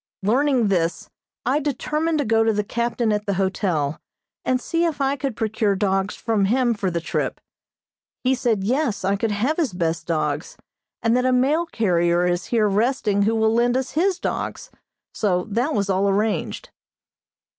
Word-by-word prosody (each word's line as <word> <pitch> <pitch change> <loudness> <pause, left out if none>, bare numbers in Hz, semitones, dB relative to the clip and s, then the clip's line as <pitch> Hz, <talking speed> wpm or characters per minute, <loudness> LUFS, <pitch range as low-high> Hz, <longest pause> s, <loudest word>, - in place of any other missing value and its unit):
Learning 250 +1 +2
this, 170 -3 -1 0.3
I 265 +5 +2
determined 305 +3 -1
to 290 - 0
go 225 0 +3
to 225 - +3
the 210 -1 0
captain 235 +1 -1
at 210 0 -2
the 200 - 0
hotel, 180 -6 -1 0.4
and 255 0 +1
see 330 +6 -1
if 330 -4 -1
I 275 0 +1
could 275 -3 -3
procure 215 -2 0
dogs 195 0 0
from 220 -4 0
him 240 +3 +2
for 200 -3 -2
the 170 -1 -2
trip. 165 - -2 0.8
He 260 +1 +3
said 235 -6 0
yes, 240 -2 0
I 195 +1 +2
could 220 +3 -1
have 230 +10 0
his 300 - 0
best 165 -2 -2
dogs, 155 -2 -2 0.5
and 230 +1 +3
that 250 - +2
a 255 - +3
mail 285 +7 +2
carrier 175 - +1
is 175 0 0
here 225 -3 +2
resting 210 0 +1
who 220 +3 +2
will 220 0 +2
lend 240 +2 +2
us 260 0 -2
his 360 +4 +1
dogs, - - -4 0.4
so 180 -4 0
that 245 +8 0
was 200 -1 0
all 195 +1 +2
arranged. 210 +2 -1
220 Hz, 175 wpm, -22 LUFS, 195-255 Hz, 0.8 s, go